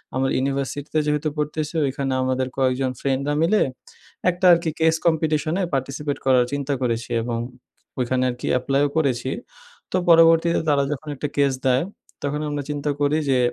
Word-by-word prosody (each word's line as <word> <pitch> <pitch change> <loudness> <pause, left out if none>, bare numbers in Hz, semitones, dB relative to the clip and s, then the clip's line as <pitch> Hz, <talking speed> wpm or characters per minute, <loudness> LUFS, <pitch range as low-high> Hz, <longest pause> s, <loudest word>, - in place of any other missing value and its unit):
আমার 135 0 +1
ইউনিভার্সিটিতে 140 +3 -2
যেহেতু 150 +1 0
পড়তেছি 150 +1 -2
ওইখানে 135 0 -2
আমাদের 130 0 0
কয়েকজন 130 0 +1
ফ্রেন্ডরা 140 +1 0
মিলে 200 +6 +3 0.7
একটা 180 +1 -1
আরকি 170 -1 +1
case 160 0 +3
competition 155 -1 +1
এ - - +1
participate 140 +2 -3
করার 130 -2 +4
চিন্তা 140 0 -2
করেছি 115 -1 -1
এবং 115 0 -2 0.6
ওইখানে 125 +1 0
আরকি 125 0 -5
apply 135 +2 0
ও - - -6
করেছি। 130 -4 0 0.6
তো - - +1
পরবর্তীতে 165 0 +6
তারা 140 -1 +3
যখন 150 +1 -5
একটা 145 +2 -3
case 140 -2 +2
দেয়, 130 0 +3 0.4
তখন 145 +1 -1
আমরা 145 -1 -3
চিন্তা 145 0 -2
করি 145 +2 +2
যে 130 - +3
140 Hz, 160 wpm, -22 LUFS, 130-155 Hz, 0.7 s, পরবর্তীতে